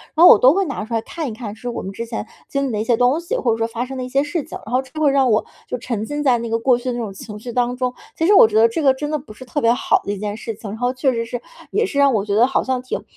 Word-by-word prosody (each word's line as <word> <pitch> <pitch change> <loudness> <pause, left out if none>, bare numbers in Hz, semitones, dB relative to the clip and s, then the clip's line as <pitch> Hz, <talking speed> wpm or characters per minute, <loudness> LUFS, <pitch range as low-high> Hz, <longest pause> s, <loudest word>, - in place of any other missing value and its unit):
然 330 +2 +7
后 - - +11
我 - - +8
都 260 +3 +6
会 390 +3 +2
拿 275 -8 -4
出 230 - -7
看 325 -3 -5
一 235 - -4
看 215 -2 -7
是 245 - -9
我 240 - -4
们 190 - -6
之 230 +4 -5
前 225 -2 -5 0.2
经 275 0 -1
历 - - -3
的 210 - -2
一 - - -1
些 235 - +3
东 250 +6 +2
西， 345 +8 -3
或 240 - +1
者 225 - 0
说， 225 0 0
发 230 +2 -4
生 265 +1 -7
的 255 - -3
一 - - -8
些 275 +2 +2
事 295 +1 -3
情， - - -7
然 220 - -9
后 255 - +3
就 270 +4 -8
会 290 -2 +4
让 270 -2 +3
我 215 - +3 0.2
就 - - -3
沉 230 -3 -3
浸 295 +4 -3
在 255 -4 +4
那 235 0 -5
个 225 - +1
过 245 +1 +3
去 245 - -12
的 250 - -1
那 240 - -4
种 215 -4 -4
情 210 +2 -9
绪 240 +3 -7
当 245 +1 0
中。 250 0 -2 0.2
其 325 - +1
实 400 - +5
我 385 - +8
觉 215 - -5
得 225 +1 +6
这 270 +8 -2
个 270 -2 +5
真 295 +3 -4
的 305 - +1
不 260 -6 -13
是 235 - -11
特 255 +4 -2
别 230 -1 +4
好 245 - +1
的 200 - -2
一 - - -5
件 205 +1 -4
事 225 -1 -5
情， 210 0 -8
然 210 - -6
后 245 +1 0
确 260 0 +1
实 230 -1 -2
是 240 +1 -5 0.3
也 450 - +1
是 285 - -5
让 280 -1 +5
我 210 -3 +1
觉 205 - -2
得 230 +4 +5
好 270 - 0
像 255 -1 -1
挺 255 - -5
245 Hz, 390 characters per minute, -20 LUFS, 225-275 Hz, 0.3 s, 后